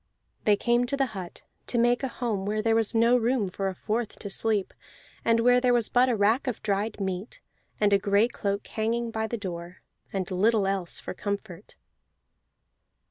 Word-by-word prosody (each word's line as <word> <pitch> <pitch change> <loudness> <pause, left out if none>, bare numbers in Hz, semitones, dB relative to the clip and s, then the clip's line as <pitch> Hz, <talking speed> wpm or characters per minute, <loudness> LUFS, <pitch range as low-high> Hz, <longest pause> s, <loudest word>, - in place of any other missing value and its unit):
They 210 - +5
came 240 +3 +1
to 280 - -1
the 270 - +2
hut, 185 -3 -8 0.2
to 240 - -1
make 240 +1 +3
a 270 - -1
home 230 -6 -3
where 215 +2 -1
there 225 0 +3
was 225 0 +1
no 230 +2 +5
room 240 -3 +1
for 195 +2 -3
a 190 - -3
fourth 220 +4 -3
to 200 - -6
sleep, 210 -2 0 0.5
and 230 0 +3
where 245 +1 +5
there 245 -1 +3
was 235 -2 +2
but 250 +1 +4
a 240 - +2
rack 220 +6 +2
of 245 -4 -3
dried 205 +1 -1
meat, 190 +2 -4 0.4
and 205 -1 +3
a 200 - +5
gray 200 +3 +3
cloak 200 -4 -3
hanging 230 +1 -2
by 220 0 -2
the 235 - -3
door, 175 -3 -7 0.3
and 190 -1 -3
little 205 +3 +3
else 195 -3 -1
for - - -6
comfort. 200 -1 -6
215 Hz, 190 wpm, -27 LUFS, 200-235 Hz, 0.5 s, They